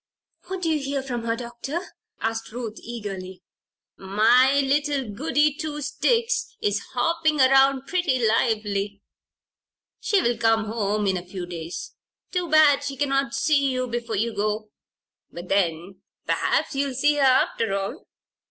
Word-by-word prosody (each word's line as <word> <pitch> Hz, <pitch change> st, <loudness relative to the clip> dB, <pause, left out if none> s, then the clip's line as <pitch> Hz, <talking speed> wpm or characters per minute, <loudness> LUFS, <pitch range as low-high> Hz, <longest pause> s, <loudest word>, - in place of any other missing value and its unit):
"What 375 Hz, -1 st, -5 dB
do 330 Hz, -, +1 dB
you 310 Hz, -, +1 dB
hear 275 Hz, 0 st, -2 dB
from 240 Hz, -3 st, -4 dB
her, 230 Hz, 0 st, 0 dB
Doctor?" 240 Hz, +6 st, -5 dB, 0.4 s
questioned 225 Hz, 0 st, -3 dB
Ruth, 230 Hz, -3 st, -6 dB
eagerly. 195 Hz, -5 st, -7 dB, 0.5 s
"My 235 Hz, +8 st, +4 dB
little 285 Hz, -1 st, 0 dB
Goody 295 Hz, +5 st, +1 dB
Two 300 Hz, -1 st, -5 dB
sticks 465 Hz, -, 0 dB
is 205 Hz, 0 st, 0 dB, 0.2 s
hopping 315 Hz, +3 st, +1 dB
around 270 Hz, 0 st, +5 dB
pretty 350 Hz, -6 st, 0 dB
lively. 210 Hz, -3 st, 0 dB, 1.0 s
She 405 Hz, -, +2 dB
will 240 Hz, -1 st, 0 dB
come 225 Hz, -1 st, +3 dB
home 210 Hz, -1 st, -1 dB
in 190 Hz, -1 st, +1 dB
a 175 Hz, -, -6 dB
few 180 Hz, -1 st, -6 dB
days. 170 Hz, -1 st, -7 dB, 0.4 s
Too 360 Hz, -2 st, -2 dB
bad 295 Hz, -2 st, +5 dB
she 275 Hz, -1 st, -4 dB
cannot 275 Hz, -1 st, 0 dB
see 280 Hz, -1 st, +2 dB
you 255 Hz, 0 st, -1 dB
before 235 Hz, -2 st, -3 dB
you 225 Hz, +3 st, -1 dB
go. 210 Hz, +1 st, -2 dB, 0.6 s
But 175 Hz, +1 st, -9 dB
then 180 Hz, -1 st, -1 dB, 0.2 s
perhaps -, -, 0 dB
you'll 275 Hz, -1 st, -1 dB
see 295 Hz, +3 st, +2 dB
her, -, -, +1 dB
after 255 Hz, -5 st, +3 dB
all." 200 Hz, -, -5 dB
245 Hz, 145 wpm, -24 LUFS, 210-285 Hz, 1.0 s, around